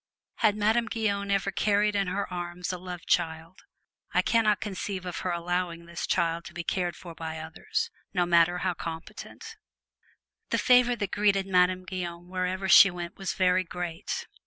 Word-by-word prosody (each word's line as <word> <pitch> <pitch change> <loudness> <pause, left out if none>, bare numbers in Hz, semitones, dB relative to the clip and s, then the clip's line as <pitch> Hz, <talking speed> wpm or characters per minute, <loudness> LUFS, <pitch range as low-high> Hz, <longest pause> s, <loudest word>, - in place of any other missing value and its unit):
Had 215 -3 +3
Madame 220 +3 +2
Guyon 200 -3 -1
ever 195 0 +1
carried 210 +1 +2
in 200 -1 +1
her 195 +3 -2
arms 175 +1 -4
a 180 - -5
love 180 -1 -8
child, 165 +1 -1 0.5
I - - +4
can 230 -1 +2
not 210 -1 +3
conceive 195 -2 -4
of 180 - -4
her 185 - -3
allowing 170 0 -2
this 170 0 -5
child 170 0 +1
to 175 - -11
be 170 - -4
cared 175 0 -1
for 170 -2 -10
by 160 0 -6
others 435 - -3 0.2
no 180 -2 +1
matter 170 0 +4
how 185 - +1
competent. 165 -1 -8 0.9
The - - +1
favor 245 -1 +5
that 230 - -16
had 200 - -1
greeted 200 -2 +2
Madame 185 -1 +2
Guyon 175 -2 -5
wherever 185 +1 -2
she 195 - +9
went 175 -1 -6
was 195 -2 -3
very 185 0 +3
great. 175 -2 -5
180 Hz, 180 wpm, -28 LUFS, 175-200 Hz, 0.9 s, she